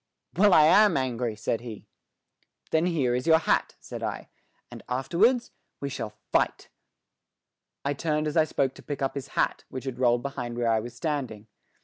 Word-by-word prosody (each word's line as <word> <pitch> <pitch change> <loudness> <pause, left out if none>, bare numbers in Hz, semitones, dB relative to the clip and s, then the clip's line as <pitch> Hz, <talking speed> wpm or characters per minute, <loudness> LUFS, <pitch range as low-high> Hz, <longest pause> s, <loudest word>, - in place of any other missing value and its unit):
"Well, 205 +3 +5
I 155 - +7
am 200 +4 +6
angry," 125 -3 -1
said 110 +2 -2
he. 115 -4 -9 0.9
"Then 160 +2 +2
here 140 -8 +1
is 125 +5 -2
your 160 -1 +7
hat," 160 - 0
said - - -8
I, - - -4 0.4
"and - - -9
afterwards 185 - +2 0.3
we 140 - -3
shall 110 -5 -6
fight." - - 0 1.2
I 140 - +1
turned 150 +1 -1
as 150 - -2
I 160 -2 +5
spoke 135 -3 0
to - - -14
pick 145 -2 -5
up 135 - 0
his 140 -1 -5
hat, - - +1
which 130 - -6
had 130 -2 -5
rolled 120 -1 +3
behind 120 -3 -5
where 120 -1 +1
I 110 - +3
was 120 +2 -8
standing. 135 -9 -3
135 Hz, 180 wpm, -27 LUFS, 120-160 Hz, 1.2 s, I